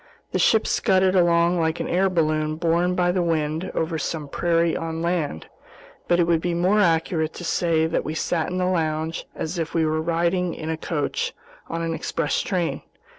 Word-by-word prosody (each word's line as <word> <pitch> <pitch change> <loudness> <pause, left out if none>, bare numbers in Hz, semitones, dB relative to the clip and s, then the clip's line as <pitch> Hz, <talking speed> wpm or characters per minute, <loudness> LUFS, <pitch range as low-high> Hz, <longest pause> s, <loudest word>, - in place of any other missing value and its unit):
The - - 0
ship 220 -1 +4
scudded 190 -3 +2
along 170 0 +3
like 160 0 0
an - - -2
air 190 +2 +2
balloon 155 -3 0
borne 170 +2 +1
by 175 -1 +2
the 180 0 0
wind 160 0 -1
over 160 0 -1
some 155 0 -3
prairie 170 +2 +1
on 165 0 -3
land; 165 - -1 0.6
but 175 - +3
it - - +5
would 165 -1 +2
be 175 0 -1
more 185 +5 +3
accurate 165 -3 +1
to - - -7
say 165 -2 +1
that 165 - -1
we 155 - -4
sat 160 0 -1
in 180 - -3
the 180 - +1
lounge 160 -2 -1
as 170 +2 -4
if 165 0 -3
we 165 -1 +3
were 155 0 0
riding 170 +2 0
in 160 0 -4
a - - -1
coach 175 - -2 0.3
on 165 0 -3
an 165 0 -1
express 160 -1 -1
train. 180 -4 -1
165 Hz, 195 wpm, -23 LUFS, 160-180 Hz, 0.6 s, it